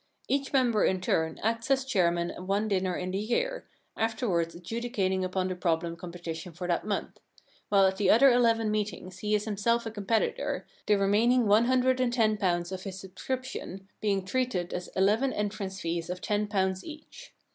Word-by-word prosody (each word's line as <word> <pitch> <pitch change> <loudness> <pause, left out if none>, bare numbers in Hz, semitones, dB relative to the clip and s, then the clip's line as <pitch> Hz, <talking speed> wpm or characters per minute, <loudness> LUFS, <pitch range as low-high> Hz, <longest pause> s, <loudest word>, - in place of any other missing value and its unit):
Each 275 0 0
member 245 -6 +3
in 185 - +2
turn 160 -3 0
acts 230 +2 -1
as 270 -1 +2
chairman 175 -7 +1
at - - -9
one 200 +2 +1
dinner 185 -3 0
in 185 0 -3
the 190 - -1
year, - - -1 0.3
afterwards 220 -7 0
adjudicating 190 0 -2
upon 185 0 -1
the 185 - -3
problem 170 -1 -1
competition 170 -1 -7
for 175 +2 -5
that 175 +3 -1
month; 205 - -3 0.5
while 195 -1 +5
at 190 0 +1
the 200 -2 +2
other 270 +4 +7
eleven 230 -3 +3
meetings 200 -3 -3
he 210 0 +1
is 210 0 -1
him 210 -2 -3
self 235 +3 +1
a 225 - -4
competitor, 220 +1 -1 0.2
the 210 - +5
remaining 225 +5 +3
one 215 +3 +5
hundred 255 0 +2
and 250 -2 +1
ten 220 -3 +3
pounds 175 -3 0
of 190 -1 -5
his 190 -1 -6
subscription 195 -1 -6
being 200 -3 0
treated 215 -6 -1
as 180 - -4
eleven 215 +8 +3
entrance 200 -2 -3
fees 170 0 -3
of 180 0 -4
ten 210 +1 -1
pounds 190 -2 0
each. 310 +11 -11
205 Hz, 185 wpm, -29 LUFS, 185-230 Hz, 0.5 s, other